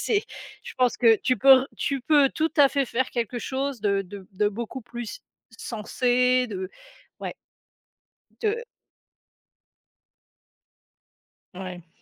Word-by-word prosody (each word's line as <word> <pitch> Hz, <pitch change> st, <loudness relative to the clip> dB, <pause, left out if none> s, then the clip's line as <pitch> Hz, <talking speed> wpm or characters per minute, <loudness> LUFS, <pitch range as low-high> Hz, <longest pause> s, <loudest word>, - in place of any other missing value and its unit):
c'est 415 Hz, -2 st, +1 dB, 0.4 s
je 485 Hz, -1 st, -9 dB
pense 250 Hz, -1 st, +2 dB
que 230 Hz, -3 st, +6 dB
tu 255 Hz, -, +2 dB
peux 270 Hz, +3 st, +8 dB
re -, -, -6 dB
tu 275 Hz, -1 st, -1 dB
peux 285 Hz, +1 st, +4 dB
tout 320 Hz, +1 st, -1 dB
à 285 Hz, -2 st, +7 dB
fait 275 Hz, 0 st, 0 dB
faire 255 Hz, +2 st, -1 dB
quelque 240 Hz, 0 st, -2 dB
chose 270 Hz, -2 st, -3 dB
de 200 Hz, -1 st, +1 dB
de 190 Hz, 0 st, -11 dB
de 205 Hz, +2 st, +1 dB
beaucoup 235 Hz, +4 st, -6 dB
plus 240 Hz, -1 st, -7 dB, 0.4 s
censé 250 Hz, +3 st, +1 dB
de 190 Hz, -2 st, -5 dB, 0.5 s
ouais. -, -, -5 dB, 1.1 s
De 455 Hz, +1 st, -1 dB, 2.9 s
Ouais. 180 Hz, -2 st, -8 dB
250 Hz, 125 wpm, -25 LUFS, 210-275 Hz, 2.9 s, peux